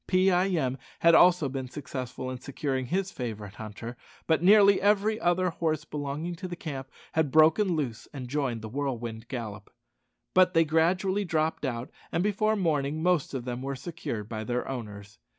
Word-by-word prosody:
Pee 185 +1 +4
eye 180 +1 +3
em 135 -8 0 0.2
had 170 0 +6
also 175 -3 +6
been 130 -1 -4
successful 130 -2 -5
in 130 - -6
securing 130 -1 -3
his 190 +6 -1
favourite 105 -5 -5
hunter: 110 +2 -7 0.3
but 160 -1 +2
nearly 200 +1 +6
every 210 +2 +2
other 175 +1 +2
horse 155 -2 -1
belonging 150 +3 -4
to 185 - -5
the 175 - -5
camp 135 -6 -6 0.2
had 160 -2 +1
broken 160 +6 +4
loose 130 -8 -3
and 130 -4 -6
joined 125 -4 -2
the - - -4
whirlwind 120 -3 -4
gallop. 110 -6 -6 0.6
But 185 -1 +5
they 165 0 +5
gradually 180 +6 +2
dropped 160 -4 0
out, 120 0 -3 0.2
and 170 - +1
before 215 +1 +1
morning 150 -7 0
the 155 - -4
most 175 -6 +1
of 125 -2 -4
them 125 0 -4
were 135 +1 -3
secured 125 -7 -5
by 110 -1 -4
their 125 +2 -2
owners. 105 -5 -7
145 Hz, 180 wpm, -28 LUFS, 125-175 Hz, 0.6 s, had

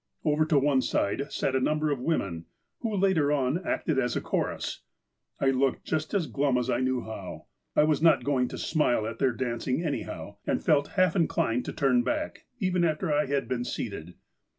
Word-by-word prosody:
Over 155 0 +3
to 155 -2 +2
one 140 -1 +3
side 135 +5 -1
sat 135 - -1
a - - +3
number 150 +3 +1
of 140 - -1
women, 100 - -1 0.3
who, 225 -3 -2
later 185 -7 +2
on, 145 +5 +1
acted 155 -5 0
as 125 -1 0
a - - +1
chorus. - - -2 0.6
I 135 - +3
looked 135 0 0
just 155 +5 -2
as 185 -5 +2
glum 140 -3 +1
as 125 +1 0
I 120 - +1
knew 130 -1 0
how. 105 -4 -8 0.3
I - - +5
was 155 0 +2
not 165 0 +5
going 130 -3 +1
to - - -7
smile 125 -8 +1
at 115 +1 -5
their 135 -2 +3
dancing, 125 +4 -2
anyhow, 140 -9 -4
and - - 0
felt 145 -3 +3
half 185 -2 +4
inclined 125 -8 +1
to - - -3
turn 135 -5 +2
back, 125 - -3
even 185 -4 +1
after 160 0 +1
I 150 0 +2
had 140 -2 -1
been 125 -1 -1
seated. 90 -8 -5
140 Hz, 195 wpm, -28 LUFS, 125-155 Hz, 0.6 s, I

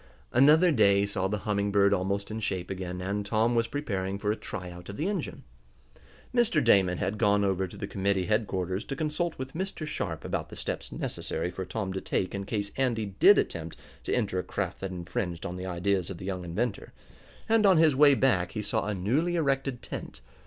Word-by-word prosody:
Another 155 +8 +6
day 100 -6 +4
saw 100 -2 -1
the 105 +2 -1
Humming 100 -1 0
Bird 100 0 +4
almost 100 +2 -1
in 110 - -3
shape 95 -4 -3
again, 90 -1 -4
and 100 +2 -2
Tom 110 +3 +1
was 115 -1 +2
preparing 100 -9 -3
for 105 +1 0
a - - 0
tryout 90 -5 -8
of 100 - -6
the 155 - -1
engine. 195 -6 -3 0.9
Mr. 240 -2 +3
Damon 90 -3 +4
had 105 +5 -2
gone 100 0 +3
over 95 -1 +1
to - - -12
the - - -4
committee 95 -1 0
headquarters 95 -3 -1
to 135 - -4
consult 160 +2 -2
with 130 +1 -6
Mr. 185 -2 -4
Sharp 90 - -4
about - - -3
the - - -9
steps - - -4
necessary 85 +2 -3
for 95 +1 -5
Tom 95 0 -3
to 95 - -3
take 95 - -1
in 100 -1 -4
case 100 0 -2
Andy 120 -5 +1
did - - +8
attempt - - -2 0.3
to - - -4
enter 100 -6 0
a - - -2
craft - - -3
that 95 - -4
infringed 90 -1 -4
on 90 -2 -4
the 90 +1 -5
ideas 90 +1 0
of 95 - -6
the 95 - -8
young 95 -2 -3
inventor, 100 +6 -3 0.5
and 225 -2 +4
on 190 -3 +6
his 155 -3 +5
way 145 0 +7
back 110 -10 +2
he 105 - -3
saw 100 - -1
a 105 - -1
newly 135 - +1
erected 135 -5 0
tent. 60 - -7
100 Hz, 210 wpm, -28 LUFS, 95-130 Hz, 0.9 s, did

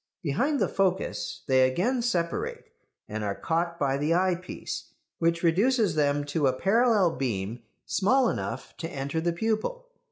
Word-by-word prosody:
Behind 265 - +1
the - - +2
focus 190 -1 -1
they 130 -2 +4
again 235 - 0
separate, 175 -8 -2 0.4
and 110 0 -4
are 100 -1 -1
caught 170 +1 -1
by 140 -4 +1
the 150 +4 +1
eyepiece, 180 0 -2 0.3
which 165 0 +1
reduces 205 +4 +3
them 145 -1 +1
to 145 0 0
a 130 - +2
parallel 210 - +3
beam 115 -3 -2 0.2
small 255 +6 +3
enough - - -4
to 165 - -4
enter 140 +2 -3
the 170 +1 +1
pupil. 225 - -2
170 Hz, 150 wpm, -27 LUFS, 145-215 Hz, 0.4 s, they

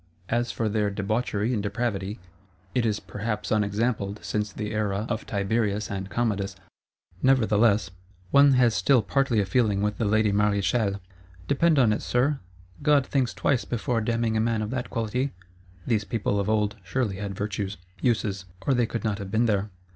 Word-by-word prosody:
As 120 +1 0
for 115 - -1
their 105 -1 +1
debauchery 105 +2 -1
and 110 - 0
depravity, 105 -1 -2 0.6
it 120 -1 +2
is 105 -1 0
perhaps 105 0 -4
unexampled 105 -1 0
since 105 -1 -2
the 105 +2 -4
era 105 -1 -1
of 115 -2 -3
Tiberius 105 +1 0
and 95 -1 -4
Commodus. 100 -4 -1 0.7
Nevertheless, 110 -6 +3 0.4
one 140 0 +7
has 125 -3 +4
still 110 +5 +3
partly 120 +4 +1
a 100 - +2
feeling 105 -1 +2
with 105 0 -1
the 115 - +1
lady 110 0 +3
Maréchale: 100 0 +1 0.5
'Depend 155 +2 +3
upon 120 -5 +5
it, - - -2
Sir, 135 +4 +1 0.4
God 145 -2 +4
thinks 130 -3 0
twice 130 -4 +1
before 120 0 -1
damning 115 0 0
a - - +2
man 115 -1 0
of 105 - -4
that 125 -1 -3
quality.' 125 +4 -1 0.5
These 110 -4 +1
people, 100 -2 -1
of 100 +1 -1
old, 105 0 +1
surely 100 +1 -1
had 100 -1 -4
virtues, 100 0 -3 0.2
uses; 105 -5 0 0.2
or 140 - +3
they 120 -2 +2
could 115 - -4
not 110 -2 -1
have 100 -1 -6
been 110 +4 +2
there. 105 -2 +1
110 Hz, 170 wpm, -26 LUFS, 100-120 Hz, 0.7 s, one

